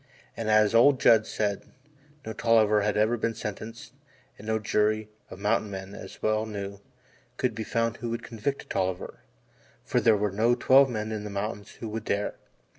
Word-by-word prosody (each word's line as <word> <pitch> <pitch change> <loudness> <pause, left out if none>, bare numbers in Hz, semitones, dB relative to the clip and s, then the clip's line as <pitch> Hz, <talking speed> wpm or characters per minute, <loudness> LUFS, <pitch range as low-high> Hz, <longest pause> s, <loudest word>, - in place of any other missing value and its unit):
And 115 -1 -3
as 110 0 +4
old 130 +4 +6
Judd 110 -1 +5
said, 100 -2 -1 0.6
no 110 - -4
Tolliver 110 -2 +3
had 105 0 0
ever 110 +3 +2
been 115 0 -1
sentenced 110 +2 -7 0.4
and 105 - -12
no 110 0 +1
jury 110 0 0 0.2
of - - -9
mountain 105 +1 0
men, 95 0 -7
he - - -10
well 110 0 +1
knew, 100 -2 -6 0.6
could 125 - 0
be 110 - -4
found 115 -1 -1
who 120 0 -5
would 115 0 -4
convict 115 +5 -3
a - - -26
Tolliver, 95 -1 -3 0.7
for - - +1
there 110 -2 +5
were 105 0 0
no 115 +5 +2
twelve 135 +2 +5
men 110 -2 -3
in 105 -1 -4
the 105 - -6
mountains 105 +1 -5
who 115 - -7
would 110 0 -5
dare. 100 +1 -1
110 Hz, 190 wpm, -27 LUFS, 105-115 Hz, 0.7 s, old